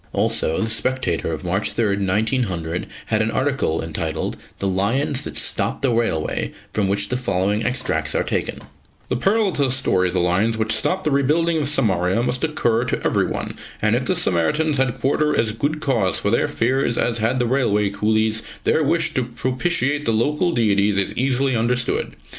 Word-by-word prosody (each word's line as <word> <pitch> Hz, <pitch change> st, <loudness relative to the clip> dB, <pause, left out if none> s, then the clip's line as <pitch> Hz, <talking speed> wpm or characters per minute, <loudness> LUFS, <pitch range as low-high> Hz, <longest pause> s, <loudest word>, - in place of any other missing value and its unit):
Also, 80 Hz, -, +1 dB
The 110 Hz, -, -1 dB
Spectator 115 Hz, -9 st, -1 dB
of 80 Hz, -2 st, -5 dB
March 95 Hz, +3 st, -1 dB
3, 105 Hz, -4 st, +1 dB
1900, 95 Hz, -4 st, -1 dB, 0.2 s
had 110 Hz, -, +1 dB
an 110 Hz, -, +1 dB
article 130 Hz, -, 0 dB
entitled 80 Hz, 0 st, -3 dB, 0.2 s
"The -, -, -4 dB
Lions 115 Hz, +9 st, 0 dB
that -, -, -5 dB
Stopped -, -, 0 dB
the 135 Hz, -, +3 dB
Railway," 115 Hz, -9 st, -1 dB, 0.2 s
from 105 Hz, -2 st, +1 dB
which 100 Hz, +1 st, 0 dB
the 125 Hz, -, 0 dB
following 105 Hz, -2 st, 0 dB
extracts 125 Hz, +1 st, -1 dB
are -, -, +2 dB
taken: -, -, -3 dB, 0.5 s
"The -, -, 0 dB
parallel 200 Hz, -, +2 dB
to 145 Hz, -4 st, +1 dB
the 130 Hz, -, 0 dB
story 125 Hz, -8 st, +2 dB
of 90 Hz, -, -4 dB
the -, -, +2 dB
lions 95 Hz, +6 st, +1 dB
which 110 Hz, 0 st, -1 dB
stopped 180 Hz, +12 st, 0 dB
the 155 Hz, -, 0 dB
rebuilding 160 Hz, +4 st, +2 dB
of 145 Hz, -, 0 dB
Samaria 95 Hz, -6 st, +1 dB
must 125 Hz, 0 st, -1 dB
occur 120 Hz, -7 st, +1 dB
to -, -, -3 dB
everyone, -, -, -1 dB, 0.2 s
and -, -, +2 dB
if -, -, -1 dB
the -, -, +1 dB
Samaritans 145 Hz, -, +1 dB
had 130 Hz, -2 st, 0 dB
quarter 150 Hz, +2 st, +1 dB
as 110 Hz, -1 st, +1 dB
good 145 Hz, +7 st, -2 dB
cause 115 Hz, -, +1 dB
for 100 Hz, -, -1 dB
their 120 Hz, -, +2 dB
fears 125 Hz, 0 st, 0 dB
as 115 Hz, -1 st, 0 dB
had 110 Hz, +4 st, +1 dB
the 125 Hz, -, +1 dB
railway 105 Hz, -5 st, +1 dB
coolies, 110 Hz, +2 st, +1 dB, 0.2 s
their 160 Hz, -, +2 dB
wish 165 Hz, +3 st, +1 dB
to 130 Hz, -, +1 dB
propitiate 130 Hz, +4 st, -1 dB
the 115 Hz, -, +2 dB
local 150 Hz, +10 st, +1 dB
deities 105 Hz, -6 st, +2 dB
is 100 Hz, -, 0 dB
easily 130 Hz, 0 st, +1 dB
understood. 120 Hz, +1 st, 0 dB
115 Hz, 185 wpm, -21 LUFS, 100-135 Hz, 0.5 s, the